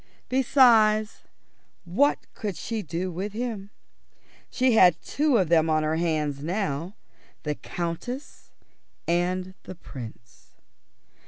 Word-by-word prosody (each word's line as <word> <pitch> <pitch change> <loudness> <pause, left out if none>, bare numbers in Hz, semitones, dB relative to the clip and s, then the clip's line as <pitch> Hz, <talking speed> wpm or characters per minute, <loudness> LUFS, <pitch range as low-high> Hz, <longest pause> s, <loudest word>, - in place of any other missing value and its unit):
Besides, 230 -5 +4 0.7
what 245 +12 +2
could 205 -6 -4
she 225 +4 -3
do 175 +1 -3
with 195 +4 -4
him? 220 -4 -4 0.8
She 255 0 +2
had 180 -7 +6
two 290 -3 +2
of 185 -6 +1
them 165 -1 +4
on 155 0 +2
her 155 +1 0
hands 155 -4 -1
now: 175 0 -2 0.5
the 150 - -1
Countess 180 - -6 0.6
and 180 +2 0
the 185 - -9
Prince. 115 -8 -11
185 Hz, 110 wpm, -26 LUFS, 165-225 Hz, 0.8 s, had